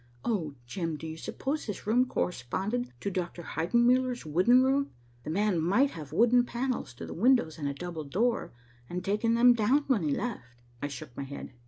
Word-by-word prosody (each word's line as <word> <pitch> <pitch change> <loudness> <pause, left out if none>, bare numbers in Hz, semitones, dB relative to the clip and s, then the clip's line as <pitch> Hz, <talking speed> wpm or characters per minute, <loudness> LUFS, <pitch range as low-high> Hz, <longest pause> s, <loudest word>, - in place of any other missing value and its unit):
Oh, 165 -11 -1
Jim, 165 +3 -3
do 160 - -8
you 160 0 -5
suppose 275 - -4
this 210 - -5
room 245 +4 +3
corresponded 195 - -2
to 200 - -2
Dr. 175 -1 -4
Heidenmuller's 240 +8 +2
wooden 185 +12 +4
room? 275 +1 +2 0.3
The - - -6
man 195 +1 +1
might 240 - +3
have 150 -4 -9
wooden 240 +7 +4
panels 240 - -3
to - - -7
the - - -7
windows 230 -6 +2
and 145 - -2
a 140 - -1
double 170 -1 -6
door, 225 - 0 0.4
and 180 +1 -4
taken 210 +3 +1
them 245 +1 +7
down 240 +6 +2
when 255 -7 +2
he 155 - 0
left." 140 - -3 0.3
I 145 - -1
shook 130 -3 -9
my - - -5
head. 140 -1 -8
200 Hz, 190 wpm, -29 LUFS, 160-245 Hz, 0.4 s, them